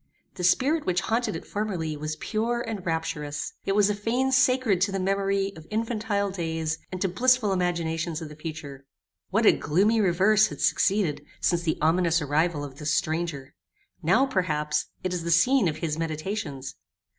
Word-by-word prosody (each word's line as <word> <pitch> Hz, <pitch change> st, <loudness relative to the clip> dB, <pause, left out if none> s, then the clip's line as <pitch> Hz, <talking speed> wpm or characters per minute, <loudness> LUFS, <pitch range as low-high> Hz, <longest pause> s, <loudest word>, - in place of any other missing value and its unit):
The 180 Hz, -, -6 dB
spirit 280 Hz, -, +2 dB
which 175 Hz, -1 st, +1 dB
haunted 225 Hz, -1 st, -1 dB
it -, -, -7 dB
formerly 185 Hz, -7 st, -3 dB
was 155 Hz, +1 st, -4 dB
pure 230 Hz, +7 st, -1 dB
and 220 Hz, -5 st, -5 dB
rapturous. 160 Hz, -3 st, -3 dB
It 195 Hz, -, +1 dB
was 205 Hz, -1 st, +5 dB
a 210 Hz, -, +1 dB
fane 235 Hz, +6 st, 0 dB
sacred 255 Hz, -7 st, +3 dB
to 200 Hz, +2 st, +2 dB
the 195 Hz, -, -2 dB
memory 195 Hz, +1 st, 0 dB
of 160 Hz, -1 st, -12 dB
infantile 215 Hz, -2 st, -1 dB
days, 160 Hz, -3 st, -2 dB
and 185 Hz, -, -4 dB
to 195 Hz, -, +2 dB
blissful 235 Hz, +2 st, +2 dB
imaginations 170 Hz, -3 st, -1 dB
of 160 Hz, -, -6 dB
the 150 Hz, -, -11 dB
future! 150 Hz, -3 st, -8 dB, 0.4 s
What 220 Hz, +5 st, +1 dB
a -, -, +9 dB
gloomy 205 Hz, +9 st, +2 dB
reverse 200 Hz, +3 st, +4 dB
had 145 Hz, -, -9 dB
succeeded 150 Hz, 0 st, +1 dB, 0.2 s
since 175 Hz, -1 st, +1 dB
the 165 Hz, -2 st, -1 dB
ominous 165 Hz, +1 st, +3 dB
arrival 150 Hz, +1 st, 0 dB
of 140 Hz, 0 st, -9 dB
this 150 Hz, 0 st, -1 dB
stranger! 155 Hz, -4 st, -2 dB, 0.5 s
Now, 180 Hz, -, +4 dB
perhaps, 150 Hz, -, -1 dB, 0.2 s
it 185 Hz, -1 st, -1 dB
is 180 Hz, -, -2 dB
the 170 Hz, -, -3 dB
scene 195 Hz, +7 st, +4 dB
of 155 Hz, -2 st, -2 dB
his 155 Hz, -1 st, -3 dB
meditations. 155 Hz, -3 st, -4 dB
180 Hz, 175 wpm, -26 LUFS, 155-210 Hz, 0.5 s, a